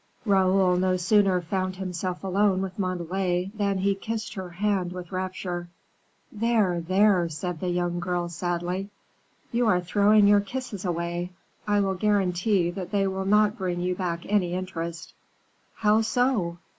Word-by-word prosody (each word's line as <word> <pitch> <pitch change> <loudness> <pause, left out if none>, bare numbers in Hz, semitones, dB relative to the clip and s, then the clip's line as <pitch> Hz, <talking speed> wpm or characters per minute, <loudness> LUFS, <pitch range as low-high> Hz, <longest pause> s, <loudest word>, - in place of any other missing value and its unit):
Raoul 190 -2 +3
no 185 0 +2
sooner 190 0 +3
found 185 +2 -2
himself 185 -1 -4
alone 195 0 +2
with 190 +1 -6
Montalais, 185 0 -1
than 200 -2 0
he 195 +1 +2
kissed 220 +3 -5
her 190 -2 -6
hand 185 0 -1
with 180 -2 -8
rapture. 185 -2 -4 0.6
"There, 215 -5 +1
there," 185 0 +3
said 165 +2 -4
the 180 - -2
young 175 0 -1
girl, 175 0 -1
sadly, 175 +3 -3 0.6
"you 240 -1 +1
are 180 -4 +4
throwing 205 +3 +4
your 205 0 +6
kisses 205 -2 -6
away; 175 0 -2 0.4
I 205 -1 +3
will 195 -1 +1
guarantee 190 -2 +1
that 180 0 -6
they 200 -2 +1
will 190 0 -2
not 210 +1 +3
bring 180 -2 -2
you 180 +1 0
back 175 -2 -3
any 185 -4 +1
interest." 170 -3 -5 0.6
"How 215 +1 +3
so? 220 -7 0
185 Hz, 150 wpm, -26 LUFS, 175-205 Hz, 0.6 s, your